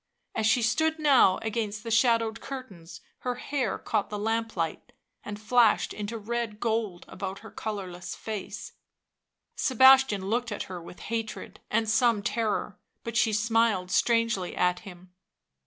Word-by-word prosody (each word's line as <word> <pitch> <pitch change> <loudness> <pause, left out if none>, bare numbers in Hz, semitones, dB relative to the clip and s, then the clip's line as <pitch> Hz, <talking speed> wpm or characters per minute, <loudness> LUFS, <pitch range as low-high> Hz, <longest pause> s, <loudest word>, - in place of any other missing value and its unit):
As 220 -1 +1
she 240 +1 +3
stood 315 +8 +2
now 280 -11 +5
against 215 -1 -3
the 230 - -5
shadowed 230 -1 +2
curtains 185 -11 -9 0.2
her 250 -1 -2
hair 260 -1 -2
caught 215 -3 -1
the 210 - -4
lamplight 220 -6 -2 0.3
and 210 0 -6
flashed 225 0 +3
into 210 +2 -5
red 225 0 -3
gold 220 -6 -1
about 195 -1 -6
her 220 - -11
colourless 190 -5 -5
face; 215 -3 -6 0.8
Sebastian 260 -5 +5
looked 240 +4 -1
at 205 - -3
her 180 -2 -7
with 170 +1 -12
hatred 225 -1 -5
and 220 +1 +1
some 220 -1 +3
terror, 215 -4 -1 0.2
but 230 0 -5
she 225 -1 +3
smiled 215 -3 +1
strangely 230 -4 +1
at 180 0 +1
him. 180 -2 -13
220 Hz, 140 wpm, -28 LUFS, 200-235 Hz, 0.8 s, now